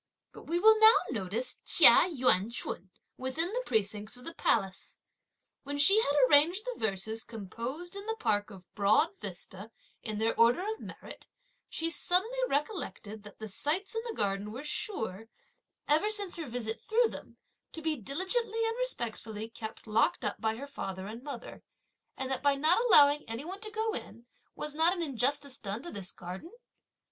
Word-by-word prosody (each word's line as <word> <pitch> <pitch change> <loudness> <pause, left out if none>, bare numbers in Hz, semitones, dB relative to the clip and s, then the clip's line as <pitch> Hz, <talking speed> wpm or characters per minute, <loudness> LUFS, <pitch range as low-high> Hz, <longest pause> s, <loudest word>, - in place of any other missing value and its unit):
But - - -13
we 335 - 0
will 440 +3 +6
now 440 +1 +8 0.2
notice 220 +2 -3
Chia - - +7
Yüan 245 - +2
ch'un, 190 -5 -3 0.3
within 315 +9 -2
the - - 0
precincts 215 +1 -1
of 250 - -14
the 330 - -6
Palace. 195 - -1 0.6
When 285 +1 -5
she 390 +10 +6
had 285 - 0
arranged 330 - +4
the - - -5
verses 220 +2 -2
composed 240 - -6
in 400 +1 -7
the 445 - -1
park 210 - 0
of 190 -3 -14
Broad 215 +10 +3
Vista 190 +2 -8 0.3
in 215 -2 -4
their 225 +1 +1
order 240 - +4
of 440 0 -3
merit, - - -11 0.4
she 330 0 -2
suddenly 380 +9 +1
recollected 280 - -3
that 205 -1 -13
the 220 - -7
sights 320 - -2
in 450 - -2
the 465 -2 -5
garden 200 +1 -1
were 255 +6 -7
sure, 225 - -2 0.6
ever 315 +8 +3
since 410 -4 -1
her 330 -4 -5
visit 225 -2 -4
through 455 +1 +2
them, - - -10 0.3
to - - -8
be 315 -1 +1
diligently 415 - -1
and 455 - -2
respectfully 225 - -3
kept 220 -1 -8
locked 220 0 +1
up 205 - -2
by 220 0 0
her 270 +5 -7
father 195 -9 -6
and 220 +4 -8
mother; 270 -4 -8 0.6
and 265 0 -3
that 265 - -1
by 285 -1 +3
not 315 +11 +3
allowing 295 -9 +7
any 230 +6 -4
one 380 +4 -7
to 435 - -6
go 440 0 -2
in 230 - -7 0.3
was 300 -1 -3
not 325 +3 +3
an 350 -3 -3
injustice 280 0 0
done 210 +4 -5
to 345 - -6
this 195 -3 -4
garden? 185 - -8
270 Hz, 175 wpm, -30 LUFS, 220-355 Hz, 0.6 s, now